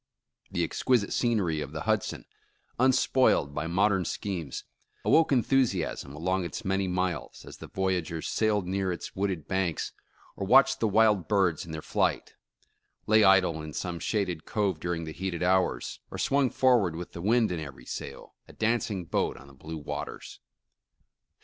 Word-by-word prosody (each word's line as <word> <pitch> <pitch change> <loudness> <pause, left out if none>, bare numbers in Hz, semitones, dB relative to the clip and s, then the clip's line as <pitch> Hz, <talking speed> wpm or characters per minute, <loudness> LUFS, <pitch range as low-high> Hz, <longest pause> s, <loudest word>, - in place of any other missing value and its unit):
The 85 - -1
exquisite 105 +5 +1
scenery 100 -10 +1
of 70 0 -6
the 80 - -4
Hudson, - - -1 0.5
unspoiled 130 - +3
by 75 +2 -3
modern 95 +2 +2
schemes, 85 -3 -4 0.4
awoke 160 -1 +4
enthusiasm 120 - +1
along 90 +4 0
its 110 +6 -6
many 95 0 0
miles, 90 -4 -3
as - - -11
the - - -10
voyagers 90 -4 -2
sailed 105 -3 +1
near 95 0 -1
its 85 - -6
wooded 95 -5 -2
banks, 95 -4 -1 0.4
or 95 - -4
watched 135 +5 +6
the 115 - +2
wild 105 -3 +3
birds 95 -6 +1
in - - -7
their 80 -1 -6
flight; - - 0 0.7
lay 110 0 +5
idle 95 -5 +4
in 75 -1 -8
some 90 -2 -4
shaded 90 -7 -1
cove 100 -6 -1
during 85 0 -2
the 80 -1 -6
heated 90 -1 -3
hours, 95 +1 +1
or - - -7
swung 140 -2 +2
forward 120 -12 +3
with 85 +1 -7
the 85 - -8
wind 110 +1 +3
in 85 - -2
every 70 -5 -9
sail, - - -7
a - - -14
dancing 110 -4 -1
boat - - -1
on 65 - -13
the 70 - -16
blue 80 +4 -8
waters. 75 - -6
95 Hz, 160 wpm, -28 LUFS, 80-105 Hz, 0.7 s, watched